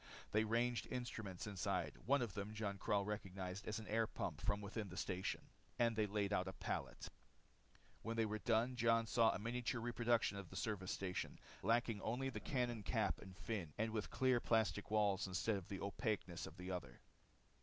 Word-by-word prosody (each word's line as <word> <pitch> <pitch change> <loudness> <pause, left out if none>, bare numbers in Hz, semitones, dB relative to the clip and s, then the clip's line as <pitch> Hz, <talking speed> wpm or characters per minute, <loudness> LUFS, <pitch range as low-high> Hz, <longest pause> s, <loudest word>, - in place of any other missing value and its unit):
They 105 +1 +4
ranged 120 +2 +1
instruments 110 -7 -4
inside 100 -4 -1
one 140 -1 +5
of 110 -6 -3
them 105 +2 -4
Jon 100 -2 -2
Karyl 100 0 +2
recognized 95 -2 -4
as 110 - -1
an 110 - -6
air 110 +1 +2
pump - - -3
from 100 0 +1
within 105 0 -4
the 90 - -8
station 95 -2 -1 0.4
and 115 -2 +3
they 110 -1 +2
laid 100 0 0
out 95 -2 +2
a 95 - -3
pallet. - - -3 0.9
When 115 0 -3
they 115 - +4
were 110 0 -2
done 115 +3 +2
Jon 115 -1 +4
saw 115 0 +5
a - - +1
miniature 120 +3 -1
reproduction 120 -2 +2
of 100 - -8
the - - -10
service 100 -4 -1
station, 95 -1 -2 0.2
lacking 115 0 +2
only 130 +4 0
the 110 - -4
cannon 120 -2 0
cap - - +1
and 95 -1 -10
fin, 95 -10 -3
and 110 +1 +1
with 110 -2 -1
clear 130 -2 +3
plastic 110 -3 +2
walls 105 -2 +3
instead 100 +4 +1
of 95 -3 -4
the 95 - -4
opaqueness 100 -4 -1
of - - -11
the 90 +1 -4
other. 70 -10 -4
110 Hz, 190 wpm, -41 LUFS, 100-115 Hz, 0.9 s, one